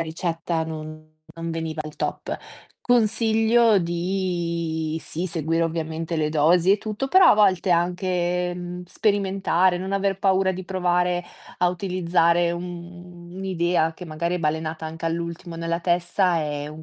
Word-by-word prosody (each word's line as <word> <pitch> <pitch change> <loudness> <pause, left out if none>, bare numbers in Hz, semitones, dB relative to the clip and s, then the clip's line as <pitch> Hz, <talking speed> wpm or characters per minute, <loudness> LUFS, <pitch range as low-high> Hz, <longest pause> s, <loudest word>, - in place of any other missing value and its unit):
ricetta 165 0 -2
non 155 0 -8 0.2
non 165 0 -5
veniva 160 -1 -4
al 155 0 -8
top. - - -3 0.4
Consiglio 225 -1 +3
di 170 -3 -2
sì 160 +4 -3
seguire 165 -1 0
ovviamente 165 0 -2
le 155 -1 +1
dosi 165 +5 +4
e - - +4
tutto, 215 +5 -3
però 375 +7 +6
a - - +6
volte 195 -3 +3
anche, 180 0 0
mhmm, 175 0 -6
sperimentare, 190 -2 +1
non 190 +2 -4
aver 195 -1 0
paura 190 -1 +2
di 185 0 -5
provare 180 -1 0 0.4
a 180 - +3
utilizzare 175 -2 +1
un, 170 +1 -4
mhmm, 175 0 -10
un'idea 175 -3 0
che 180 - -9
magari 170 +2 -2
è 180 - -1
balenata 160 0 -2
anche 160 +1 -7
all'ultimo 170 +1 -4
nella 165 0 -2
testa, 175 0 +1
è 145 -1 -3
un 155 +1 -9
175 Hz, 145 wpm, -24 LUFS, 165-185 Hz, 0.4 s, però